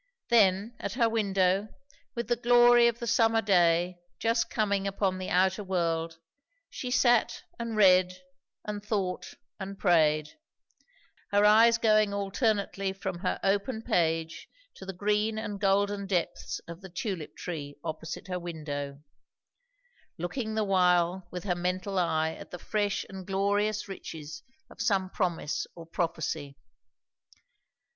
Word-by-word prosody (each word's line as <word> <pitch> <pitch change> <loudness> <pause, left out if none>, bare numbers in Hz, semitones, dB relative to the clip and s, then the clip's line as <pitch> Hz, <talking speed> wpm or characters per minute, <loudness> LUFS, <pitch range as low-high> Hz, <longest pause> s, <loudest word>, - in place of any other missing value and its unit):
Then, 210 0 +3
at - - -4
her 235 -2 +3
window, 195 -3 +1 0.5
with 235 0 -3
the 240 - +2
glory 240 0 +6
of 235 -1 0
the 235 - -5
summer 225 0 +3
day 175 -3 +2 0.2
just 230 0 +1
coming 200 -2 0
upon 195 -1 -1
the 185 - -4
outer 190 +3 +2
world, 165 -3 -1 0.5
she 250 - -5
sat 245 -2 +2 0.2
and 230 -1 -3
read 185 -2 +5 0.5
and 210 -1 -5
thought 195 -4 -3 0.2
and 195 0 -6
prayed; 155 - +2 0.9
her 205 +1 +4
eyes 225 +2 +6
going 215 -3 +3
alternately 200 -1 -1
from 190 -2 -5
her 185 - -2
open 205 +4 0
page 165 -7 0 0.3
to 190 - -10
the 190 - -4
green 210 +3 0
and 205 -2 -4
golden 200 0 +1
depths 180 -3 -2
of 170 +2 -9
the 190 - -10
tulip 175 -2 -5
tree 145 -5 -6
opposite 160 +2 -6
her 180 -1 -3
window; 145 -4 -6 1.1
looking 220 +6 -3
the 220 - +1
while 180 -2 +2
with 180 -1 -6
her 185 - 0
mental 185 +2 -2
eye 160 -2 +1
at - - -11
the 180 - -7
fresh 205 +2 -1
and 190 -1 -9
glorious 205 +2 0
riches 155 -5 -8 0.3
of - - -10
some 195 -5 +1
promise 170 -5 -2
or 170 - -10
prophecy. 160 -4 -3
195 Hz, 135 wpm, -29 LUFS, 175-215 Hz, 1.1 s, glory